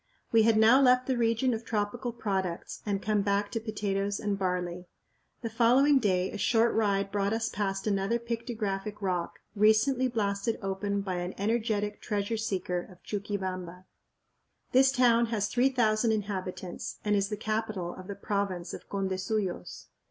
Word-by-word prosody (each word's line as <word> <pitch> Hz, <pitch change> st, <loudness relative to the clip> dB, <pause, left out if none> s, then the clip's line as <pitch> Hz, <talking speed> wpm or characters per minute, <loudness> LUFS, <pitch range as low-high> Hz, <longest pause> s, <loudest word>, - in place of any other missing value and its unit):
We 225 Hz, -, +6 dB
had 220 Hz, 0 st, +4 dB
now 225 Hz, +5 st, +6 dB
left 255 Hz, -1 st, +5 dB
the 260 Hz, -, 0 dB
region 235 Hz, +2 st, +2 dB
of 225 Hz, 0 st, -4 dB
tropical 225 Hz, +3 st, -2 dB
products 190 Hz, -6 st, -3 dB
and 200 Hz, -1 st, -1 dB
come 210 Hz, -1 st, +2 dB
back 200 Hz, 0 st, 0 dB
to 225 Hz, -, -1 dB
potatoes 205 Hz, -2 st, -2 dB
and 205 Hz, -1 st, -1 dB
barley. 180 Hz, -2 st, -2 dB, 0.6 s
The 230 Hz, -, -2 dB
following 255 Hz, +5 st, +5 dB
day 185 Hz, -5 st, +1 dB
a 210 Hz, -, -6 dB
short 230 Hz, +3 st, +3 dB
ride 200 Hz, -3 st, +1 dB
brought 200 Hz, +1 st, 0 dB
us 225 Hz, 0 st, -1 dB
past 195 Hz, -2 st, -2 dB
another 200 Hz, +2 st, +1 dB
pictographic 220 Hz, -4 st, -4 dB
rock, 180 Hz, -4 st, -2 dB, 0.2 s
recently 220 Hz, +5 st, +4 dB
blasted 215 Hz, -1 st, -1 dB
open 200 Hz, +1 st, -2 dB
by 185 Hz, -2 st, -3 dB
an 175 Hz, +1 st, -4 dB
energetic 210 Hz, -1 st, -1 dB
"treasure 210 Hz, +1 st, -1 dB
seeker" 185 Hz, -5 st, -2 dB
of 180 Hz, -, -18 dB
Chuquibamba. 185 Hz, -3 st, -4 dB, 0.9 s
This 265 Hz, +1 st, +5 dB
town 240 Hz, -3 st, +4 dB
has 215 Hz, -3 st, 0 dB
3000 240 Hz, -3 st, +2 dB
inhabitants 190 Hz, -4 st, -4 dB
and 210 Hz, 0 st, +3 dB
is 200 Hz, -1 st, +1 dB
the 210 Hz, -, -3 dB
capital 215 Hz, -4 st, -2 dB
of 185 Hz, 0 st, -10 dB
the 200 Hz, -, -5 dB
province 195 Hz, -3 st, -2 dB
of -, -, -9 dB
Condesuyos. 190 Hz, -, -2 dB
205 Hz, 155 wpm, -29 LUFS, 195-230 Hz, 0.9 s, We